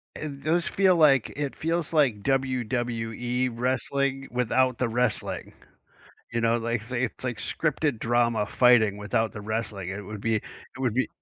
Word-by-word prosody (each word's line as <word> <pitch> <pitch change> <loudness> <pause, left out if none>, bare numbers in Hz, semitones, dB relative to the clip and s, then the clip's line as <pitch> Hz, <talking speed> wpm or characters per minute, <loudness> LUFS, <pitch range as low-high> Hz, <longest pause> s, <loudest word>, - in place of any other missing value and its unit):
It 140 -3 -6
does 165 +2 +1
feel 190 -2 +3
like 145 -7 +5
it 145 -1 -3
feels 165 0 -2
like, 130 -10 +2
WWE 125 -2 -1
wrestling 135 +3 -1
without 125 +1 +1
the 125 -3 0
wrestling, 120 -1 -2 0.8
you 115 - 0
know, 115 0 +3
like, 115 0 -2
it's 120 +3 -11
it's 130 0 -2
like 120 -3 -2
scripted 150 -5 -1
drama 120 -2 +1
fighting 110 -3 +4
without 105 +2 -1
the 110 - -7
wrestling 105 -4 -3
it 100 +2 -4
would 105 +1 -8
be 115 +1 +1
it 105 - -3 0.4
would 125 -4 0
be 130 -1 +1
120 Hz, 160 wpm, -26 LUFS, 115-135 Hz, 0.8 s, like